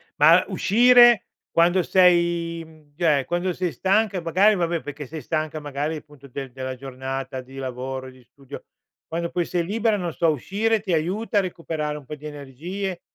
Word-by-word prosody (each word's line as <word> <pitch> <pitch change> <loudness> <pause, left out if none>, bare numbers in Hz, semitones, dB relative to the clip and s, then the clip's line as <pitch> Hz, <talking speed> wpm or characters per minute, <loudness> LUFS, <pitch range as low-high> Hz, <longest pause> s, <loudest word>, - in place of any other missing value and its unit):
Ma 165 +4 +6
uscire 240 +3 +5 0.3
quando 175 +2 +3
sei, 170 -2 +2
mhmm 155 -2 -20
cioè, 150 -5 +2
quando 175 +2 -1
sei 175 -1 -3
stanca 200 +1 +1
e - - -3
magari 185 +6 +3
vabbè, 170 -2 0
perché 145 +2 -7
sei 155 +4 -8
stanca 155 +2 -3
magari, 145 +2 -3
appunto 145 -2 -14
del 135 0 -6
della 130 0 -5
giornata 130 0 -5
di 130 +1 -15
lavoro 130 0 -5
e 130 - -10
di 130 -1 -19
studio, 135 +2 -12 0.4
quando 170 +1 -3
poi 175 - -1
sei 170 0 -2
libera, 220 +2 +1
non 175 -3 -3
so, 165 +1 +2
uscire 205 - 0
ti 195 -3 -3
aiuta 195 +7 0
a - - +3
recuperare 160 -4 -4
un 145 - -12
po' 150 - -7
di 150 +1 -14
energie? 165 +7 -6
165 Hz, 185 wpm, -23 LUFS, 140-185 Hz, 0.4 s, Ma